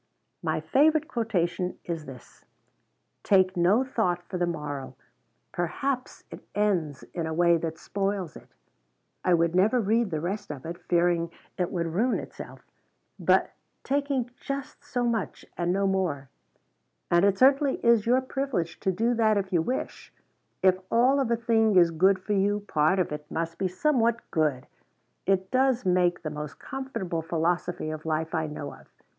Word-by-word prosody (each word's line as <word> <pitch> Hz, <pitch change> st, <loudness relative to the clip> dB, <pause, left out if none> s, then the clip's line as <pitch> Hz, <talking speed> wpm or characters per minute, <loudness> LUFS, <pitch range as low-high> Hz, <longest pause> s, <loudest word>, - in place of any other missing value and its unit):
"My -, -, -1 dB
favorite 305 Hz, +2 st, +3 dB
quotation 185 Hz, -6 st, -1 dB
is 165 Hz, -3 st, -4 dB
this: 130 Hz, -2 st, -13 dB, 0.8 s
'Take 185 Hz, -2 st, +3 dB
no 185 Hz, +8 st, +4 dB
thought 185 Hz, -9 st, -1 dB
for 180 Hz, 0 st, -5 dB
the 175 Hz, -, +1 dB
morrow.' 145 Hz, -5 st, -5 dB, 0.6 s
Perhaps 255 Hz, -, -3 dB
it -, -, -10 dB
ends 175 Hz, -10 st, 0 dB
in 165 Hz, -2 st, -2 dB
a 160 Hz, -, -3 dB
way 170 Hz, 0 st, +4 dB
that 160 Hz, -1 st, -4 dB
spoils 195 Hz, -4 st, -3 dB
it; -, -, -13 dB, 0.8 s
I 180 Hz, -, +4 dB
would 170 Hz, 0 st, +1 dB
never 205 Hz, +7 st, +3 dB
read 225 Hz, +1 st, +2 dB
the 160 Hz, -3 st, -2 dB
rest 200 Hz, +5 st, -4 dB
of 140 Hz, -3 st, -7 dB
it, 170 Hz, +1 st, -6 dB
fearing 170 Hz, -1 st, +2 dB, 0.3 s
it 180 Hz, -1 st, -1 dB
would 170 Hz, -3 st, -1 dB
ruin 205 Hz, +10 st, +1 dB
itself, -, -, -9 dB, 0.6 s
but -, -, +3 dB, 0.3 s
taking 275 Hz, -3 st, -1 dB
just 275 Hz, +1 st, -6 dB
so 245 Hz, 0 st, -2 dB
much 230 Hz, -5 st, -2 dB
and 175 Hz, 0 st, 0 dB
no 195 Hz, +2 st, +1 dB
more 180 Hz, -8 st, -1 dB, 0.8 s
and 175 Hz, +1 st, +5 dB
it 200 Hz, -1 st, +3 dB
certainly 270 Hz, +2 st, +4 dB
is 235 Hz, -2 st, +4 dB
your 250 Hz, +2 st, +4 dB
privilege 260 Hz, -10 st, -3 dB
to 190 Hz, -, +1 dB
do 230 Hz, +6 st, +1 dB
that 220 Hz, -2 st, +3 dB
if 195 Hz, -1 st, -2 dB
you 170 Hz, -, +4 dB
wish 250 Hz, +11 st, -4 dB, 0.5 s
if 185 Hz, -1 st, +5 dB
all 255 Hz, +4 st, +4 dB
of 265 Hz, -4 st, 0 dB
a 235 Hz, -, +3 dB
thing 225 Hz, -2 st, +2 dB
is 170 Hz, -2 st, +6 dB
good 190 Hz, +4 st, +4 dB
for 195 Hz, +3 st, -3 dB
you, 205 Hz, +1 st, +1 dB
part 160 Hz, -2 st, +2 dB
of 180 Hz, -4 st, 0 dB
it 150 Hz, 0 st, -6 dB
must 165 Hz, 0 st, -3 dB
be 195 Hz, -, +1 dB
somewhat 235 Hz, +3 st, +1 dB
good 145 Hz, -4 st, 0 dB, 0.6 s
it 190 Hz, -1 st, +1 dB
does 260 Hz, -3 st, +2 dB
make 180 Hz, -2 st, +2 dB
the 155 Hz, -, -3 dB
most 150 Hz, -2 st, -6 dB
comfortable 260 Hz, -11 st, -4 dB
philosophy 165 Hz, 0 st, -1 dB
of 155 Hz, 0 st, -6 dB
life 160 Hz, +1 st, -1 dB
I 160 Hz, -2 st, 0 dB
know 150 Hz, -1 st, -6 dB
of. -, -, -16 dB
185 Hz, 165 wpm, -27 LUFS, 165-230 Hz, 0.8 s, is